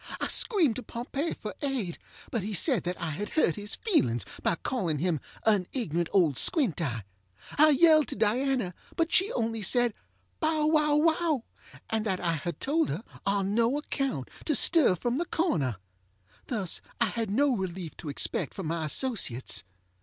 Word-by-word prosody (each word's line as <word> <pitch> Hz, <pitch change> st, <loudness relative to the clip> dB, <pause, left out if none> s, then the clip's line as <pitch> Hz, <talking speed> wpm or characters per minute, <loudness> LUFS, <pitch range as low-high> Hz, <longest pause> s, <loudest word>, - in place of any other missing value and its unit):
I -, -, -1 dB
screamed 345 Hz, -, +2 dB
to -, -, -4 dB
Pompey 260 Hz, +7 st, -4 dB
for 210 Hz, -, -6 dB
aid; 255 Hz, -, -2 dB, 0.3 s
but 230 Hz, -, -1 dB
he 205 Hz, +2 st, -3 dB
said 245 Hz, -, +2 dB
that 180 Hz, +1 st, -3 dB
I 160 Hz, -, -3 dB
had 205 Hz, +8 st, -4 dB
hurt 240 Hz, -, +2 dB
his 205 Hz, +1 st, -2 dB
feelings 120 Hz, -, +1 dB, 0.2 s
by -, -, +1 dB
calling 170 Hz, -, -2 dB
him 165 Hz, 0 st, 0 dB, 0.3 s
ŌĆ£an 205 Hz, -5 st, +3 dB
ignorant 170 Hz, -, -1 dB
old 160 Hz, -9 st, +3 dB
squint 260 Hz, -, +2 dB
eye. 120 Hz, -8 st, -2 dB, 0.5 s
ŌĆØ -, -, -10 dB
I 310 Hz, +1 st, +8 dB
yelled 310 Hz, +1 st, +5 dB
to -, -, -5 dB
Diana; 230 Hz, -1 st, +1 dB, 0.2 s
but 330 Hz, 0 st, 0 dB
she 385 Hz, +4 st, +4 dB
only 225 Hz, -2 st, -1 dB
said 240 Hz, +3 st, +3 dB, 0.5 s
ŌĆ£bow 310 Hz, -1 st, +2 dB
wow 300 Hz, -2 st, +3 dB
wow, 315 Hz, +2 st, +4 dB, 0.6 s
ŌĆØ -, -, -17 dB, 0.2 s
and 220 Hz, -1 st, 0 dB
that 190 Hz, -2 st, 0 dB
I 170 Hz, -2 st, 0 dB
had 165 Hz, +2 st, -4 dB
told 310 Hz, +2 st, +1 dB
her 170 Hz, +10 st, -3 dB, 0.2 s
ŌĆ£on 200 Hz, -1 st, +1 dB
no 230 Hz, +6 st, +2 dB
account 275 Hz, -, -3 dB, 0.2 s
to 305 Hz, -, +2 dB
stir 300 Hz, -, +5 dB
from 240 Hz, -, -1 dB
the 345 Hz, -, 0 dB
corner. 155 Hz, -, 0 dB
ŌĆØ 95 Hz, 0 st, -35 dB
Thus 205 Hz, -8 st, -1 dB, 0.2 s
I 235 Hz, -, +4 dB
had 225 Hz, -1 st, -2 dB
no 265 Hz, +5 st, +2 dB
relief 185 Hz, -4 st, -5 dB
to 155 Hz, -, -7 dB
expect 140 Hz, -, -1 dB
from 190 Hz, -, -5 dB
my 160 Hz, 0 st, -2 dB
associates. 155 Hz, -, -1 dB
215 Hz, 185 wpm, -28 LUFS, 170-280 Hz, 0.6 s, I